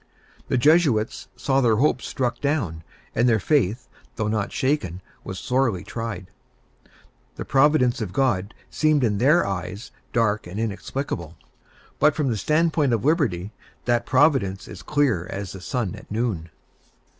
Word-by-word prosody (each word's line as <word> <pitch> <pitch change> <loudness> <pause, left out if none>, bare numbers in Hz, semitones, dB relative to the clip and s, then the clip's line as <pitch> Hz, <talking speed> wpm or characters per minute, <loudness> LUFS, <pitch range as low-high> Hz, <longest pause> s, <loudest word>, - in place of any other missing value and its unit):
The - - +1
Jesuits 140 -6 +3
saw 135 +3 +1
their 115 -3 +4
hopes 130 +2 +1
struck 120 -2 -2
down; 115 - -1 0.3
and 120 +2 +3
their 110 -2 +3
faith, 120 - +1 0.3
though 110 - -1
not 105 -2 -1
shaken, 130 - -1 0.2
was 95 - -6
sorely 125 -7 0
tried. 115 -6 -6 1.0
The - - -6
Providence 135 -3 +3
of 105 -5 -3
God 105 -5 0 0.2
seemed 155 -3 +2
in 105 -4 +1
their 150 +8 +4
eyes 95 +4 -5 0.2
dark 110 -4 +1
and 95 +4 -6
inexplicable; 105 - -4 0.6
but, 150 +1 +4
from 145 -4 0
the 115 - -1
stand 155 - +2
point 145 -6 +2
of 115 +2 -1
Liberty, 115 - +1 0.3
that 120 -1 +1
Providence 130 -9 +2
is - - -9
clear 130 - +1
as 100 -2 -5
the 95 - -9
sun 115 0 -2
at 105 +1 -12
noon. 105 -7 -2
120 Hz, 150 wpm, -24 LUFS, 100-140 Hz, 1.0 s, their